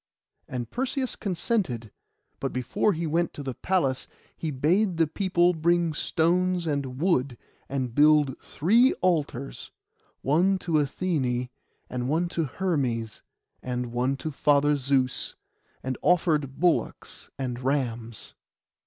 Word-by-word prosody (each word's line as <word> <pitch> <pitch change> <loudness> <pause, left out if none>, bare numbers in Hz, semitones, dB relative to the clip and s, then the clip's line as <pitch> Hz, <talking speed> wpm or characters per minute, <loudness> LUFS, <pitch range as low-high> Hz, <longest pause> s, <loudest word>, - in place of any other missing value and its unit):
And 125 -2 -4
Perseus 260 +1 -2
consented; 175 - -2 0.5
but - - -2
before 130 - 0
he 165 0 -3
went 165 +2 0
to 145 - -7
the 135 -2 -3
palace 140 -5 0 0.3
he 160 - -4
bade 170 +7 +1
the 165 - +4
people 175 +1 +2
bring 170 0 +2
stones 175 +3 +1
and 140 -4 -2
wood, 140 -8 +1 0.3
and 130 -3 -2
built 150 -1 +5
three 230 - +3
altars, 145 -7 -1 0.5
one 180 +8 +3
to 180 -2 -6
Athené, 135 -5 -1 0.4
and 125 0 -3
one 170 +4 +1
to 165 -2 -1
Hermes, 130 - -2 0.4
and 125 -1 -3
one 125 +3 0
to 155 +3 -4
Father 145 +1 +3
Zeus, 135 -2 0 0.5
and 130 -1 -3
offered 155 -6 +2
bullocks 175 -1 -1
and 125 -3 -3
rams. 120 -4 -2
150 Hz, 125 wpm, -26 LUFS, 130-175 Hz, 0.5 s, built